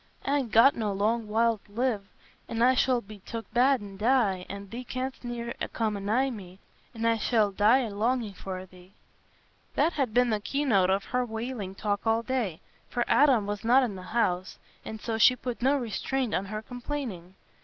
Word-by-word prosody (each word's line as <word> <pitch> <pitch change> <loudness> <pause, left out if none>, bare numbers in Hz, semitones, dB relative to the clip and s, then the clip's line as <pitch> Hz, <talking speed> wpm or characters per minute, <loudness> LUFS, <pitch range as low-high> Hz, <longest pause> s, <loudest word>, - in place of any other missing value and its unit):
I'n 275 -2 +1
got 230 +6 +6
no 215 -3 -1
long 215 +3 0
while 225 +1 +2
t' 205 - -24
live. 225 -4 -1 0.4
An' 230 0 0
I 255 +1 +6
shall 255 -1 +2
be 210 0 -12
took 225 +1 -8
bad 255 +1 +4
an' 200 -1 -9
die, 210 -5 +2
an' 200 0 -7
thee 240 +4 -6
canst 260 +1 -5
ne'er 235 -1 -4 0.2
come 220 -2 0
a - - -4
nigh 235 +7 +1
me, 190 -5 -9 0.4
an' 225 0 -3
I 230 -1 +2
shall 215 -3 +2
die 215 +7 +4
a 230 -4 -3
longing 225 0 0
for 185 -1 -6
thee." 185 0 -18 0.8
That 335 - +2
had 270 -6 0
been 245 +1 +3
the 215 - +1
key 280 +7 -2
note 195 -8 +3
of 195 +1 +1
her 250 +4 -1
wailing 225 -4 -5
talk 205 +1 -2
all 225 +1 +2
day; 230 -10 -2 0.3
for 240 -1 -1
Adam 260 -8 +4
was 205 0 -4
not 250 +4 +5
in 220 -6 -2
the 185 - -8 0.2
house, 185 -5 0 0.3
and 220 - -7
so 225 0 -3
she 250 +3 +7
put 245 -2 -5
no 270 +3 +3
restraint 250 +1 -2
on 195 - 0
her 215 +2 -5
complaining. 245 -8 -6
225 Hz, 200 wpm, -28 LUFS, 200-250 Hz, 0.8 s, she